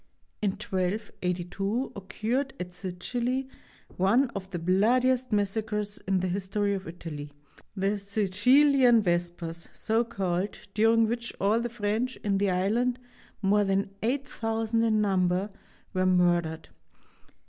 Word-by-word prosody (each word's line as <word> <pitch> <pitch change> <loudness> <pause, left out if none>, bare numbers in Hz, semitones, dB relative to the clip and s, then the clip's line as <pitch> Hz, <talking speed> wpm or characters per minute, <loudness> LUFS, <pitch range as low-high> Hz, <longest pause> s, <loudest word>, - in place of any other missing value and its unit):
In 200 -3 +1
1282 195 +1 -2
occurred 230 +7 -2
at 180 0 -5
Sicily 240 +9 -2 0.5
one 230 +8 +3
of 190 -1 -6
the 185 - -4
bloodiest 245 +9 +2
massacres 210 0 -1
in 190 -1 +2
the 185 - 0
his 190 +1 -2
tory 205 +1 0
of 195 -1 -4
Italy, 150 -4 -7 0.4
the 200 +1 0
Sicilian 230 +5 +4
Vespers, 175 -2 -2
so 225 +1 +1
called, 190 -3 -2 0.2
during 225 +1 +4
which 235 +1 -3
all 205 +4 +3
the 240 +1 -2
French 225 +3 -1
in 195 -2 +1
the 200 0 +2
island, 220 +7 +1 0.5
more 205 +2 +4
than 195 0 0
8000 225 -3 -1
in 220 -2 +3
number, 190 0 +1 0.4
were 185 -1 +2
murdered. 175 -3 +2
205 Hz, 125 wpm, -28 LUFS, 185-230 Hz, 0.5 s, Sicilian